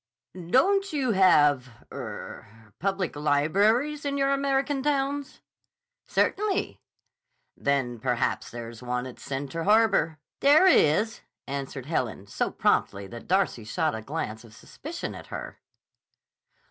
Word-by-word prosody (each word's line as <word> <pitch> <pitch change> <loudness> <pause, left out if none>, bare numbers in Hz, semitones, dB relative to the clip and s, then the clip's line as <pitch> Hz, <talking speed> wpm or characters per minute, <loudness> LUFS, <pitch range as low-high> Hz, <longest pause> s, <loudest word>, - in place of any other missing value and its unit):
"Don't 315 - +2
you 265 -5 +1
have—er—public 145 - 0
libraries 200 - +2
in 280 -1 -1
your 275 0 +2
American 275 0 0
towns?" 280 0 -1 0.7
"Certainly." 415 -1 0 0.8
"Then 130 -4 -1
perhaps 125 +1 -1
there 120 -1 -7
is 115 0 -11
one 125 0 -2
at 130 - -9
Center 140 +4 -4
Harbor." 210 -6 +3 0.2
"There 295 +6 +6
is," 220 - +4 0.2
answered 135 -1 -5
Helen, 120 - -2
so 100 - -2
promptly 100 0 0
that 120 0 -10
Darcy 185 - +1
shot 155 +8 -1
a 110 - -4
glance 110 -4 -5
of 110 -2 -15
suspicion 310 - -7
at - - -10
her. - - -7
165 Hz, 115 wpm, -27 LUFS, -, 0.8 s, There